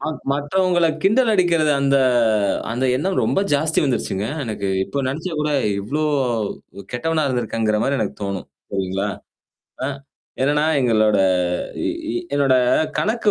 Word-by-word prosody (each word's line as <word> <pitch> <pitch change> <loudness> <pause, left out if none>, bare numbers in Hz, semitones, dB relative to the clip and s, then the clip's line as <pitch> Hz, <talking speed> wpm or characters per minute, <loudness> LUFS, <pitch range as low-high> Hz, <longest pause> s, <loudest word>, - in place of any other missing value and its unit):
ம 155 - -2 0.2
மற்றவங்கள 175 +4 +1 0.2
கிண்டல் 225 +4 +4
அடிக்கிறது 170 -5 +3
அந்த 140 0 +3 0.8
அந்த 125 +3 -1
எண்ணம் 185 +8 0
ரொம்ப - - +1
ஜாஸ்தி 155 +2 +1
வந்துருச்சுங்க. 105 -6 -1 0.2
எனக்கு 105 -4 -3 0.2
இப்போ 140 - -5
நெனச்சா 160 +6 -4
கூட 150 0 0 0.3
இவ்ளோ 145 +10 -2 0.9
கெட்டவனா 155 +5 0
இருந்திருக்கங்கிற 115 -3 0
மாரி 140 0 0
எனக்கு 105 - -3
தோணும். 100 -1 -4 0.3
சரிங்களா? 95 +1 -1 0.8
ஆ. - - -1 0.5
என்னன்னா 150 +2 +2 0.2
எங்களோட 110 -4 +3 0.7
இ 330 -1 -3 0.2
என்னோட 140 -2 +3 0.4
கணக்கு 220 0 +1
140 Hz, 120 wpm, -21 LUFS, 110-170 Hz, 0.9 s, கிண்டல்